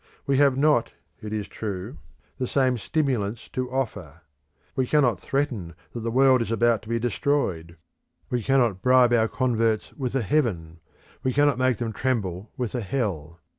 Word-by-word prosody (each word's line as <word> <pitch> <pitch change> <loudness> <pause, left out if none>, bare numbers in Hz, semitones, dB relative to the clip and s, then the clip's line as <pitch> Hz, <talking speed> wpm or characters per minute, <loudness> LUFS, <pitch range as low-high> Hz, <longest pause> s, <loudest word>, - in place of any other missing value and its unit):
We 140 -2 +2
have 140 -2 +4
not, 145 -4 +2 0.3
it 105 - -6
is 105 -2 -3
true, 100 -4 -6 0.4
the 130 - -1
same 130 -3 +1
stimulants 120 -6 -1
to 130 -1 -3
offer. 105 - -4 0.5
We 130 -2 0
cannot 125 - +3
threaten 115 - -2 0.2
that 120 - -4
the 115 0 -3
world 130 +1 +4
is 115 - -2
about 115 -1 +2
to 110 - -13
be 115 - +1
destroyed; 105 - -1 0.5
we 125 -1 0
cannot 120 -6 +2
bribe 125 -1 +5
our 115 -1 +4
converts 115 -4 0
with 130 -2 -3
a 135 - +1
heaven, 95 - -1 0.4
we 130 - 0
cannot 145 -2 +3
make 130 -2 +2
them 115 -2 -3
tremble 105 -6 -2
with 125 -4 -3
a 125 - -2
hell. 90 - -3
120 Hz, 170 wpm, -25 LUFS, 105-130 Hz, 0.5 s, bribe